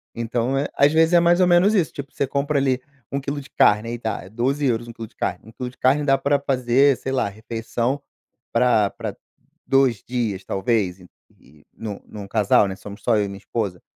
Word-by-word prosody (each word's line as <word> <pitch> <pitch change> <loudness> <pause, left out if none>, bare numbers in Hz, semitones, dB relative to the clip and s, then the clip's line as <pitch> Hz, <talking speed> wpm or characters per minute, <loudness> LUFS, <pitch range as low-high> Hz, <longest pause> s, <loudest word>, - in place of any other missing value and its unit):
Então, 115 +3 -1
é 140 - 0
às 145 +2 +4
vezes 160 +1 +4
é 175 - +7
mais 175 +1 +4
ou 180 - +5
menos 175 +4 +5
isso, 185 -7 +2
tipo, 140 -1 -8
você - - 0
compra 140 +2 -1
ali 135 -2 +1 0.3
1 140 - -1
quilo 140 +1 -4
de 135 - -15
carne 105 +2 +3
aí 120 0 -4
tá, 110 -5 -3
é 95 - -12
12 130 +7 -1
euros, 120 -2 0
1 115 - -9
quilo 115 0 -8
de - - -32
carne, - - -2
1 110 - -13
quilo 125 +2 -5
de 125 - -19
carne 135 +4 +3
dá 135 -1 +4
pra 140 +1 +1
fazer, 135 0 +3
sei 130 - -5
lá, 135 - +1
refeição 115 +5 -3 0.5
pra 115 -4 +3
pra - - -6 0.5
2 135 -5 +3
dias 115 -6 -3
talvez, 95 -2 0
e 90 - -15 0.3
e 75 +1 -22
num 105 -3 -6
num 100 -2 -9
casal, 100 -1 +3
né, 95 - -5
somos 100 +2 -11
só 115 -3 +3
eu 105 - +1
e - - -4
minha 100 0 -8
esposa. 100 -4 -3
120 Hz, 230 wpm, -22 LUFS, 105-140 Hz, 0.5 s, é